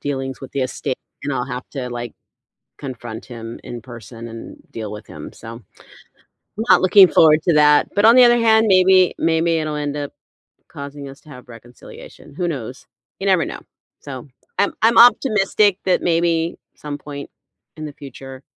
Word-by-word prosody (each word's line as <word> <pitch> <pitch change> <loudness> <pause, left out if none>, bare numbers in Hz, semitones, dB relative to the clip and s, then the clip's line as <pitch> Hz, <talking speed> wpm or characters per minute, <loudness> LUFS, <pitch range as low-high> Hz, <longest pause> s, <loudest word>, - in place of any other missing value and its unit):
dealings 135 -2 -4
with 135 - -10
the 140 - -2
estate, 130 +1 -4 0.3
and 145 - -2
I'll 125 -1 -2
have 125 -2 -7
to, 130 -3 -5
like, 120 -1 -6 0.7
confront 120 -5 -8
him 115 -2 -9
in 120 -1 -8
person 120 -1 -11
and 115 0 -10
deal 110 -2 -6
with 105 0 -10
him, - - -10
so 115 +1 -10
I'm 115 -5 -17 0.9
not - - +6
looking 185 +1 +7
forward 155 -2 +4
to 170 - +2
that, 150 0 +4
but 205 - +3
on 230 +2 +7
the 255 - +8
other 240 0 +5
hand, 220 -1 +3
maybe 185 -1 +4
maybe 165 0 +1
it'll 155 -1 -3
end 145 -1 -3
up 145 -1 -5 0.6
causing 140 0 -9
us 135 0 -13
to 155 - -20
have 125 -2 -13
reconciliation, 120 +4 -14
who 180 +2 -2
knows? 130 -4 -7 0.3
You 195 - -3
never 185 -4 +3
know. - - -7 0.4
So 135 0 -9 0.3
I'm 200 - +1
I'm 225 +1 +4
optimistic 210 -5 +4
that 185 - +1
maybe 170 -1 0 0.2
some 145 -1 -7
point 140 0 -9 0.5
in 155 - -7
the 150 - -8
future, 135 -2 -11
145 Hz, 180 wpm, -19 LUFS, 125-175 Hz, 0.9 s, the